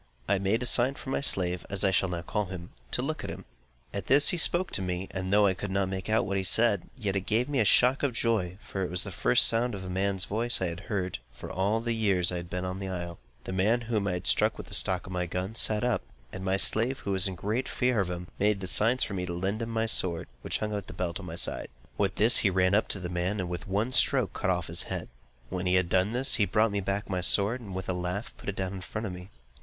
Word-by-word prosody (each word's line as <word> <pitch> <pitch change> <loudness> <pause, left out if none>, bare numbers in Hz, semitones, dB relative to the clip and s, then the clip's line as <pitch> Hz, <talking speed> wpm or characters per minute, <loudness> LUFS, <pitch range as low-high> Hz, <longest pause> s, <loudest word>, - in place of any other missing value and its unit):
I 100 -1 +2
made 100 +5 0
a - - 0
sign 125 +3 +5
for 130 - -8
my - - 0
slave 90 -9 +2
(as 100 0 -2
I 95 - +3
shall 95 0 +1
now 85 -1 -4
call 105 +2 -2
him) 90 -2 -8 0.2
to - - -1
look - - -3
at - - -5
him. - - -8 0.5
At 100 - -5
this 140 +3 +5
he 180 - +1
spoke 175 +2 +3
to - - -2
me, 90 0 -3
and 95 0 -4
though 105 0 +5
I 95 - +3
could 100 +2 -6
not 95 0 0
make 95 +1 -5
out 110 - +2
what 100 -2 -2
he 95 - -1
said, 105 0 +2
yet 100 -5 -2
it 95 -1 -3
gave 115 +4 +1
me 145 -2 -1
a 110 - +3
shock 125 +6 +4
of 140 -3 0
joy; 105 -6 -1
for 95 - -4
it 90 - -3
was 90 +1 -2
the - - -6
first - - +5
sound 115 0 +3
of 95 - -7
a 90 - -6
man's 95 0 0
voice 115 +3 0
that 95 - -1
I - - -1
had 85 +1 -6
heard, 95 - -3
for - - -9
all 100 +4 0
the 115 0 -1
years 100 -6 +2
I 90 - -3
had 85 0 -7
been 90 +1 -3
on 90 +1 -4
the 95 - -4
isle. 85 -2 -5 0.2
The 95 - -6
man 105 +6 +2
whom 110 -3 -1
I 90 - 0
had 90 - -5
struck - - +2
with - - -9
the - - -8
stock 95 -1 +4
of 90 - -9
my 90 -1 -2
gun, 90 +4 -4
sat 110 -1 +1
up; 125 -2 +1 0.3
and 95 - -6
my 95 0 +1
slave, 120 +6 +3
who 100 - -3
was 95 +1 +3
in 95 - -4
great 110 +8 -2
fear 125 -3 0
of 95 -3 0
him, 90 0 -5
made 100 -2 +1
signs 115 +7 +4
for - - -4
me 90 -1 -3
to 85 - -4
lend 95 +5 -2
him 115 - -3
my 115 0 0
sword, 90 -6 +1
which - - -2
hung 105 0 -3
in 105 - -1
a 95 - -11
belt 85 -1 -3
at - - -9
my - - -6
side. - - -2 0.3
With 100 -2 0
this 110 +4 +5
he 100 - +3
ran 95 0 +2
up 105 - +2
to 95 - -1
the 90 - -5
man, 90 +4 -2
and 90 - -2
with 90 +4 -6
one 105 +6 -1
stroke 130 -2 +3
cut - - -2
off 90 -2 0
his 85 +1 0
head. - - -4 0.4
When 90 0 -3
he 90 - +3
had 90 -2 +2
done 95 +3 +2
this, 130 +3 +3
he 105 - +3
brought 105 +3 +2
me 100 - -1
back 100 +2 -3
my 90 -1 -2
sword 100 +7 +3
with 95 0 -5
a 95 - -1
laugh, 90 +4 -4
and - - -26
put - - -7
it 100 - -4
down 95 -1 -3
in 95 - -7
front 110 +4 -5
of 95 - -4
me. 90 +1 -10
95 Hz, 290 wpm, -28 LUFS, 90-110 Hz, 0.5 s, sign